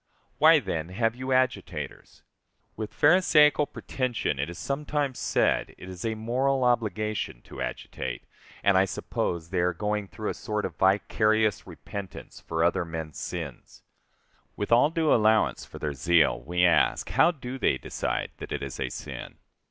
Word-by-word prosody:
Why, - - +8
then, 80 +1 -3
have 115 +4 0
you 130 +1 -5
agitators? 125 - -2 0.5
With 110 -1 -5
Pharisaical 150 -3 +5
pretension 120 - -2
it 75 +4 -1
is 85 - -8
sometimes 140 0 -2
said - - +1
it 90 - -10
is 90 -2 -8
a 110 -1 -1
moral 130 +4 0
obligation 110 - -1
to - - -9
agitate, 65 -2 -5 0.4
and 100 -1 +5
I 95 - +4
suppose 85 -2 -3
they 95 - 0
are 90 0 +2
going 105 +1 -2
through 110 +2 -5
a - - -1
sort 105 -2 -3
of 85 - -5
vicarious 105 +3 +2
repentance 100 -2 -8
for 80 0 -2
other 85 +1 +2
men's 80 -2 -6
sins. - - -7 0.7
With 105 - -4
all 120 +5 +6
due 165 -1 +2
allowance 110 -1 +3
for - - -11
their 75 -1 -3
zeal, 75 -2 +3
we 90 +7 +1
ask, 85 - +3
how - - +5
do 130 -5 -6
they 65 - +2
decide - - -3
that - - -8
it - - -3
is 70 -1 -6
a - - -1
sin? - - -8
105 Hz, 160 wpm, -27 LUFS, 85-125 Hz, 0.7 s, Why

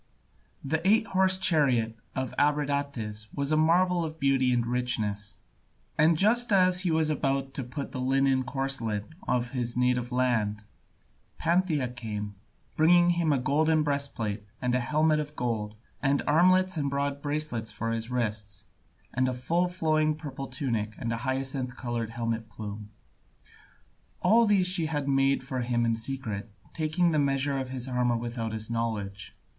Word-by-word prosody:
The 160 +4 0
eight 215 +4 +4
horse 190 -2 +2
chariot 135 -11 +2 0.2
of 130 -2 -3
Abradatas 140 -7 0
was 140 +1 0
a - - +4
marvel 175 +3 +3
of 160 0 -6
beauty 135 -2 +2
and 120 -1 +1
richness; 105 -5 -1 0.6
and 160 +1 +4
just 230 +6 +4
as 185 -2 +4
he 185 -1 0
was 160 -1 +2
about 135 -2 -1
to 135 - -3
put 135 +4 -5
on - - -16
the 130 - -4
linen 135 0 +2
corslet 130 -6 -2 0.2
of 120 -1 0
his 120 -2 -2
native 125 0 +1
land, 115 -5 0 0.8
Pantheia 165 -6 +1
came, 105 -3 -5 0.4
bringing 175 +2 +5
him 170 -2 +1
a 140 - +3
golden 155 +4 +2
breastplate 140 -8 -2 0.2
and 125 -1 -1
a 125 - +3
helmet 155 +4 +2
of 150 0 -5
gold, 110 -5 -2 0.3
and 140 0 +1
armlets 185 +3 +4
and 140 -2 0
broad 140 0 -2
bracelets 145 -7 -2
for 115 +2 -3
his 115 0 -2
wrists, 105 -5 -3 0.5
and 130 0 +1
a 125 - -3
full 170 +8 0
flowing 155 -3 +1
purple 140 -3 -7
tunic, 115 -6 -3
and 115 -1 -3
a - - -2
hyacinth 130 0 -2
coloured 120 -3 -3
helmet 115 -1 -3
plume. 105 -1 -7 1.3
All 225 +5 +4
these 200 -3 +3
she 180 -3 +2
had 145 -3 -2
made 135 0 +2
for 130 -1 -3
him 120 -1 0
in 115 - +2
secret, 110 -3 -4 0.2
taking 165 +2 +1
the 155 - +2
measure 140 0 +1
of 130 -1 -4
his 130 -1 -3
armour 125 -2 +1
without 115 -1 -4
his 110 0 -3
knowledge. 110 -4 -3
135 Hz, 160 wpm, -28 LUFS, 115-155 Hz, 1.3 s, bringing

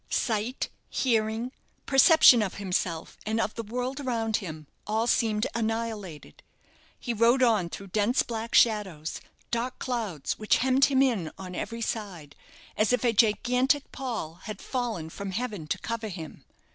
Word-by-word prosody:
Sight, 225 +2 -1 0.2
hearing, 225 0 0 0.3
perception 270 -3 +7
of 200 -3 -2
himself, 180 -4 -3
and 220 +2 -1
of 215 - 0
the 230 - -4
world 250 +5 -4
around 230 -5 0
him, 160 -6 -7 0.2
all 220 +2 +1
seemed 220 -2 +2
annihilated. 225 -7 -4 0.6
He 240 - -3
rode 235 +4 +4
on 215 -8 +3
through 195 +3 -8
dense 215 +4 +2
black 230 0 -4
shadows, 190 -9 +2 0.3
dark 240 +2 -2
clouds 215 - -3
which 215 - +3
hemmed 265 +2 +4
him 270 -1 +3
in 220 -12 0
on 185 -1 -8
every 230 +5 -4
side, 190 -10 -4 0.4
as 215 +1 +2
if 250 - +1
a 235 - +3
gigantic 250 +6 +2
pall 225 -11 -5
had 215 -3 -6
fallen 230 -11 -3
from 200 +2 -6
heaven 205 -5 -4
to - - -1
cover 230 -1 -4
him. 170 -6 -8
225 Hz, 150 wpm, -27 LUFS, 200-245 Hz, 0.6 s, perception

